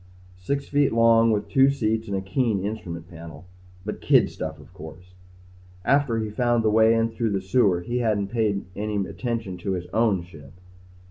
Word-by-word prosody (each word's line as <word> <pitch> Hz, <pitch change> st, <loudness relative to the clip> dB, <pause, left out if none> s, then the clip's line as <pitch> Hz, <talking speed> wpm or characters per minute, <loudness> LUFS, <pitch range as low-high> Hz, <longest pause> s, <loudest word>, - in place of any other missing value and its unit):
Six 140 Hz, +9 st, -3 dB
feet 145 Hz, -3 st, +2 dB
long 115 Hz, 0 st, +5 dB
with 105 Hz, -2 st, 0 dB
two 135 Hz, -1 st, +4 dB
seats 110 Hz, -4 st, -1 dB
and 100 Hz, -1 st, -2 dB
a -, -, -2 dB
keen 100 Hz, +1 st, -1 dB
instrument 85 Hz, -6 st, -6 dB
panel. 85 Hz, 0 st, -11 dB, 0.4 s
But 105 Hz, -, -5 dB
kid -, -, +4 dB
stuff 80 Hz, -1 st, -6 dB
of 75 Hz, +4 st, -16 dB
course. 90 Hz, +1 st, -12 dB, 0.7 s
After 140 Hz, -3 st, +2 dB
he 110 Hz, -1 st, -3 dB
found 120 Hz, +1 st, +1 dB
the 110 Hz, -, +2 dB
way 110 Hz, +1 st, +5 dB
in 115 Hz, 0 st, +1 dB
through 115 Hz, 0 st, -2 dB
the 100 Hz, -2 st, -1 dB
sewer 95 Hz, -2 st, +2 dB
he 120 Hz, +7 st, -3 dB
hadn't 105 Hz, -4 st, 0 dB
paid 105 Hz, -3 st, -1 dB
any 105 Hz, 0 st, -3 dB
more 100 Hz, -, -2 dB
attention 115 Hz, -7 st, -4 dB
to 95 Hz, +2 st, -2 dB
his 90 Hz, -1 st, -4 dB
own 110 Hz, -6 st, +2 dB
ship. 80 Hz, -4 st, -14 dB
105 Hz, 190 wpm, -24 LUFS, 95-115 Hz, 0.7 s, long